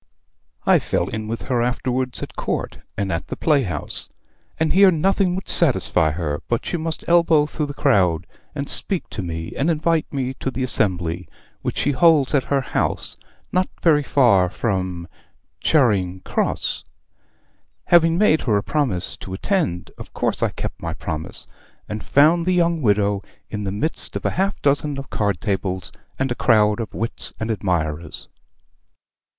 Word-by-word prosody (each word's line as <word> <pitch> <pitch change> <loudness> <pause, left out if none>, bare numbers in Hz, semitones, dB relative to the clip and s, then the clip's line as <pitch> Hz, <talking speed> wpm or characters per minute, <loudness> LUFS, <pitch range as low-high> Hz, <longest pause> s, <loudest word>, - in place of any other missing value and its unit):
I - - +5
fell - - -1
in 110 0 -4
with 115 +1 -4
her 125 -2 0
afterwards 125 +1 -1
at - - -8
Court, - - -3 0.2
and 100 -1 -1
at 85 -1 -3
the - - -4
playhouse; 130 - -1 0.5
and 160 -1 +2
here 195 +1 +7
nothing 185 +2 +2
would 190 - -5
satisfy 120 - +3
her 75 -2 -3
but 120 - 0
she - - -2
must 165 -1 -4
elbow 170 -3 +5
through 150 0 -3
the 145 - -7
crowd 95 - +2 0.3
and 140 -1 -3
speak 190 +3 -2
to 105 - -3
me, 80 -2 -5
and 145 +5 +1
invite 165 0 +1
me 130 -2 -2
to - - -2
the 130 0 -3
assembly, 90 -7 0 0.3
which - - -3
she 145 - +2
holds 150 -1 +4
at 140 -3 +2
her 140 -1 +1
house, 125 - -2 0.4
not 185 +1 +1
very 155 -3 +5
far 115 -10 +4
from 95 -4 -2 0.5
Ch - - 0
r 130 -7 +6
ng 95 -2 -2
Cr - - -1
ss. - - -3 1.0
"Having 165 -1 +5
made 180 -6 +4
her 110 -5 +2
a 100 - -1
promise 125 - -1
to 95 - -7
attend, 100 - -1
of - - -11
course - - -1
I - - +2
kept - - -6
my - - -4
promise; 80 0 -5 0.4
and 105 0 -5
found 165 +4 +4
the 185 - +3
young 170 -2 +2
widow 100 -3 +2 0.3
in 105 -1 -3
the 95 - -1
midst 110 +12 -3
of - - -4
a - - +2
half 195 +2 0
dozen 145 0 +1
of 135 - -7
card 100 -4 0
tables, 95 -2 -2 0.3
and 135 -1 -1
a - - +3
crowd 105 -3 +3
of 115 - -5
wits 115 +1 -4
and 110 +1 -1
admirers. 85 -6 -2
125 Hz, 175 wpm, -22 LUFS, 95-155 Hz, 1.0 s, here